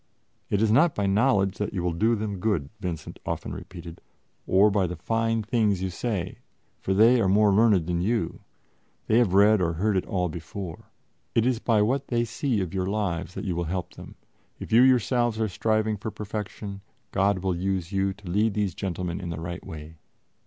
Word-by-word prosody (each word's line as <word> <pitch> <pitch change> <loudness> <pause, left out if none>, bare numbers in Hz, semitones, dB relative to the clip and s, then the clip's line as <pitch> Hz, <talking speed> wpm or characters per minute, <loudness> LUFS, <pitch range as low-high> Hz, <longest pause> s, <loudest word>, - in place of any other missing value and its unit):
"It 100 +1 +1
is 110 - +3
not 145 +7 +4
by 100 - 0
knowledge 100 -1 +2
that 105 0 -3
you 90 - -1
will 90 -1 0
do 110 +8 +2
them 105 -3 -4
good," 95 -9 0
Vincent 90 -5 -5
often - - -4
repeated, 85 -2 -9 0.5
"or 100 +3 +5
by 100 -2 +1
the 90 - -5
fine 115 +4 0
things 105 -4 +1
you 95 - -2
say, 90 -2 -3 0.4
for 95 - -1
they 115 +4 +6
are 100 - +2
more 100 +1 +4
learned 105 -5 +4
than 85 0 -1
you 110 -2 -1 0.7
they 110 +2 +3
have 100 -6 +2
read 105 0 +5
or 85 -2 +1
heard 100 +5 0
it 95 - -1
all 90 -2 0
before. 85 +2 -7 0.5
It 115 - +3
is 125 -2 +1
by 110 -4 +2
what 130 +5 0
they 120 -1 0
see 115 -1 -1
of 95 -1 -4
your 95 -1 -1
lives 90 -5 -2
that - - -5
you 90 -4 -1
will 85 0 -1
help 90 +1 -4
them; - - -12 0.4
if - - -8
you 115 +2 +7
yourselves 120 -2 +3
are 110 - +1
striving 110 +2 0
for 105 - -5
perfection, 105 -1 -6 0.3
God 95 -1 +1
will 95 -2 0
use 95 0 -2
you 95 0 +1
to 100 0 -12
lead 105 +4 +1
these 105 -4 0
gentlemen 90 -1 -4
in 90 - -5
the 80 -2 -4
right 85 +2 -6
way." 80 0 -9
100 Hz, 200 wpm, -26 LUFS, 90-110 Hz, 0.7 s, you